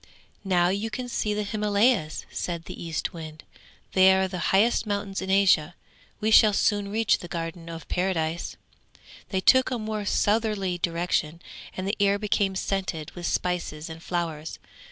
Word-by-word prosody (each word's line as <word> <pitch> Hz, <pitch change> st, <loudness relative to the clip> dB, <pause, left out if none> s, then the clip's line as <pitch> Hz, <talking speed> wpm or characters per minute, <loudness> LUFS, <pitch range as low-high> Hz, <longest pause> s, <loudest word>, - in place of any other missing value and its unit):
_] -, -, -37 dB, 0.4 s
'Now 180 Hz, -3 st, +2 dB
you 200 Hz, +4 st, -1 dB
can 245 Hz, +3 st, -5 dB
see 210 Hz, -3 st, -1 dB
the 210 Hz, -, -1 dB
Himalayas!' 210 Hz, -4 st, +1 dB
said 170 Hz, -2 st, -4 dB
the -, -, -8 dB
Eastwind. 160 Hz, -1 st, -5 dB, 0.5 s
'They 190 Hz, 0 st, +7 dB
are 190 Hz, 0 st, +2 dB
the 180 Hz, -2 st, -3 dB
highest 215 Hz, +3 st, +3 dB
mountains 200 Hz, -2 st, -2 dB
in 190 Hz, -, -5 dB
Asia; 185 Hz, -4 st, +3 dB, 0.4 s
we 215 Hz, +1 st, 0 dB
shall 215 Hz, -1 st, +7 dB
soon 205 Hz, 0 st, +1 dB
reach 220 Hz, +1 st, +2 dB
the 175 Hz, -, -8 dB
Garden 165 Hz, 0 st, -5 dB
of 165 Hz, -1 st, -8 dB
Paradise.' 170 Hz, -3 st, -1 dB, 0.7 s
They 190 Hz, -2 st, -1 dB
took 260 Hz, +6 st, +5 dB
a 250 Hz, -, -2 dB
more 215 Hz, -2 st, -4 dB
southerly 205 Hz, -4 st, +1 dB
direction, 170 Hz, -2 st, -1 dB, 0.4 s
and 185 Hz, +1 st, -3 dB
the 200 Hz, -, -1 dB
air 200 Hz, 0 st, +3 dB
became 200 Hz, -2 st, 0 dB
scented 185 Hz, -5 st, -3 dB
with 175 Hz, -1 st, -5 dB
spices 170 Hz, -3 st, -2 dB
and 160 Hz, 0 st, -9 dB
flowers. 165 Hz, -3 st, -3 dB
190 Hz, 160 wpm, -26 LUFS, 170-210 Hz, 0.7 s, They